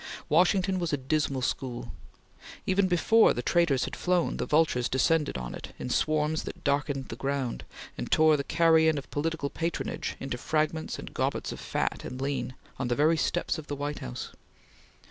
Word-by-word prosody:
Washington 185 Hz, +3 st, +3 dB
was 170 Hz, -2 st, -1 dB
a 145 Hz, -, +1 dB
dismal 135 Hz, -1 st, -1 dB
school. 125 Hz, -1 st, -3 dB, 0.7 s
Even 190 Hz, 0 st, +3 dB
before 185 Hz, +6 st, +4 dB
the 120 Hz, -, -3 dB
traitors 160 Hz, -5 st, +2 dB
had -, -, -6 dB
flown, 180 Hz, -1 st, +1 dB
the -, -, -2 dB
vultures 150 Hz, -6 st, +2 dB
descended 150 Hz, -, +2 dB
on 60 Hz, -1 st, -5 dB
it -, -, -9 dB
in 125 Hz, -, -5 dB
swarms 155 Hz, +2 st, +1 dB
that -, -, -8 dB
darkened 140 Hz, -1 st, 0 dB
the -, -, -5 dB
ground, 135 Hz, 0 st, -2 dB, 0.4 s
and -, -, -4 dB
tore 155 Hz, 0 st, +5 dB
the 140 Hz, -, -1 dB
carrion 160 Hz, -1 st, +4 dB
of 140 Hz, -, -7 dB
political 150 Hz, -1 st, -2 dB
patronage 165 Hz, +1 st, -3 dB
into 135 Hz, -2 st, -4 dB
fragments 155 Hz, +2 st, -1 dB
and -, -, -9 dB
gobbets -, -, -1 dB
of -, -, -7 dB
fat -, -, -2 dB
and 125 Hz, -, -6 dB
lean, 135 Hz, -1 st, -2 dB, 0.2 s
on 130 Hz, -, -1 dB
the 120 Hz, -, +1 dB
very 155 Hz, +4 st, +4 dB
steps 175 Hz, 0 st, 0 dB
of 155 Hz, -, -10 dB
the 145 Hz, -, -3 dB
White 145 Hz, +1 st, -3 dB
House. -, -, -6 dB
150 Hz, 180 wpm, -28 LUFS, 135-165 Hz, 0.7 s, tore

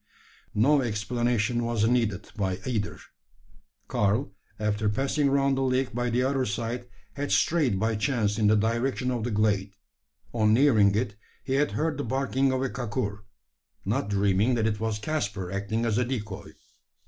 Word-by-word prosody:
No 140 Hz, +7 st, +4 dB
explanation 120 Hz, 0 st, 0 dB
was 115 Hz, -2 st, +1 dB
needed 115 Hz, -5 st, 0 dB
by 95 Hz, -3 st, -1 dB
either. 110 Hz, -5 st, -2 dB, 0.9 s
Karl, 105 Hz, +3 st, +1 dB, 0.3 s
after 105 Hz, 0 st, 0 dB
passing 135 Hz, +6 st, +1 dB
round 140 Hz, 0 st, +2 dB
the 135 Hz, -, -1 dB
lake 130 Hz, 0 st, 0 dB
by 120 Hz, +1 st, -1 dB
the 120 Hz, +2 st, +1 dB
other 135 Hz, 0 st, +1 dB
side, 120 Hz, +2 st, -3 dB, 0.3 s
had 145 Hz, 0 st, -3 dB
strayed 145 Hz, -, +2 dB
by 110 Hz, +1 st, +1 dB
chance 105 Hz, -3 st, 0 dB
in 105 Hz, -, +3 dB
the 110 Hz, -, +5 dB
direction 120 Hz, +4 st, 0 dB
of 120 Hz, -3 st, -2 dB
the 120 Hz, -, -1 dB
glade. 105 Hz, -2 st, +1 dB, 0.6 s
On 110 Hz, -2 st, +3 dB
nearing 110 Hz, -7 st, +5 dB
it, 110 Hz, -2 st, -1 dB, 0.3 s
he 130 Hz, -, -2 dB
had 145 Hz, +2 st, +1 dB
heard 155 Hz, -2 st, -1 dB
the -, -, -1 dB
barking 135 Hz, +2 st, +1 dB
of 130 Hz, 0 st, 0 dB
a 135 Hz, -, 0 dB
kakur 105 Hz, -3 st, -3 dB, 0.6 s
not 105 Hz, +2 st, -1 dB
dreaming 100 Hz, +4 st, +2 dB
that 115 Hz, -2 st, +1 dB
it 105 Hz, -2 st, 0 dB
was 110 Hz, -1 st, -1 dB
Caspar 100 Hz, -, -3 dB
acting 100 Hz, +4 st, -2 dB
as 115 Hz, 0 st, +1 dB
a -, -, +3 dB
decoy. 105 Hz, -9 st, -5 dB
115 Hz, 165 wpm, -27 LUFS, 105-130 Hz, 0.9 s, the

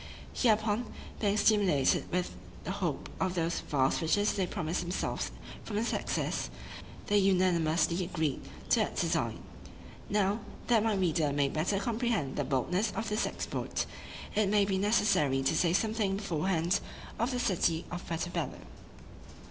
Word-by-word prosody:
Hereupon, 220 Hz, -1 st, +2 dB, 0.3 s
being 205 Hz, -1 st, +1 dB
stimulated 200 Hz, -11 st, +3 dB
with 180 Hz, 0 st, 0 dB, 0.3 s
the -, -, -3 dB
hope -, -, -2 dB
of 185 Hz, -1 st, 0 dB
those 170 Hz, -1 st, 0 dB
vast 135 Hz, -2 st, +1 dB
riches 205 Hz, +6 st, +2 dB
they 190 Hz, -2 st, 0 dB
promised 175 Hz, -3 st, -2 dB
themselves 175 Hz, +1 st, -2 dB, 0.3 s
from 210 Hz, -, -5 dB
their 215 Hz, +2 st, +1 dB
success, -, -, -1 dB, 0.6 s
they 205 Hz, 0 st, +3 dB
unanimously 175 Hz, -3 st, +2 dB
agreed 160 Hz, -5 st, -1 dB, 0.3 s
to -, -, +5 dB
that -, -, 0 dB
design. -, -, -1 dB, 0.7 s
Now, 205 Hz, +1 st, +2 dB, 0.3 s
that 230 Hz, -3 st, +3 dB
my 220 Hz, -2 st, +2 dB
reader 165 Hz, -5 st, +1 dB
may 140 Hz, -1 st, +2 dB
better 165 Hz, +8 st, 0 dB
comprehend 220 Hz, -, -1 dB
the -, -, 0 dB
boldness 180 Hz, -, 0 dB
of 225 Hz, -, -3 dB
this 210 Hz, +2 st, +1 dB
exploit, -, -, -3 dB, 0.5 s
it 210 Hz, -2 st, +2 dB
may 205 Hz, -1 st, +4 dB
be 195 Hz, -1 st, 0 dB
necessary 190 Hz, -10 st, +3 dB
to 135 Hz, -, +2 dB
say 170 Hz, -, +3 dB
something 210 Hz, 0 st, +1 dB
beforehand 180 Hz, -1 st, 0 dB, 0.4 s
of 235 Hz, +3 st, +1 dB
the 250 Hz, -, -1 dB
city 175 Hz, -7 st, +1 dB
of 175 Hz, 0 st, -5 dB
Puerto 170 Hz, +1 st, -2 dB
Bello. -, -, -3 dB
190 Hz, 150 wpm, -31 LUFS, 165-210 Hz, 0.7 s, to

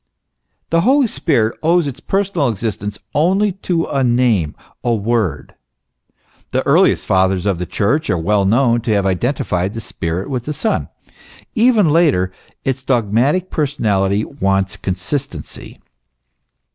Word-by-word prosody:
The 165 Hz, 0 st, +3 dB
Holy 265 Hz, +7 st, +4 dB
Spirit 115 Hz, -, 0 dB
owes 170 Hz, +1 st, +3 dB
its 140 Hz, -2 st, -5 dB
personal 195 Hz, -8 st, 0 dB
existence 105 Hz, -1 st, -4 dB, 0.2 s
only 190 Hz, +7 st, +2 dB
to 180 Hz, -3 st, -2 dB
a 135 Hz, -2 st, -1 dB
name, 120 Hz, -10 st, +2 dB, 0.3 s
a 120 Hz, -1 st, +1 dB
word. 105 Hz, -7 st, -1 dB, 1.0 s
The -, -, -1 dB
earliest -, -, +3 dB
Fathers 95 Hz, 0 st, +2 dB
of 95 Hz, -4 st, 0 dB
the 90 Hz, -, -3 dB
Church 140 Hz, -, 0 dB
are 90 Hz, -, +2 dB
well 100 Hz, +5 st, +1 dB
known 120 Hz, +3 st, +3 dB
to 115 Hz, -1 st, 0 dB
have 100 Hz, -2 st, +1 dB
identified 95 Hz, -1 st, -1 dB
the -, -, -3 dB
Spirit 85 Hz, -4 st, -4 dB
with 125 Hz, -4 st, -3 dB
the 150 Hz, -, -3 dB
Son. 220 Hz, +8 st, -1 dB, 0.6 s
Even 225 Hz, -5 st, +4 dB
later, 145 Hz, -, +3 dB, 0.3 s
its 130 Hz, -1 st, -1 dB
dog 120 Hz, -6 st, 0 dB
matic 150 Hz, +11 st, +1 dB
personality 105 Hz, -9 st, 0 dB
wants 95 Hz, -7 st, -1 dB
consistency. 95 Hz, -, -5 dB
120 Hz, 135 wpm, -18 LUFS, 95-155 Hz, 1.0 s, Holy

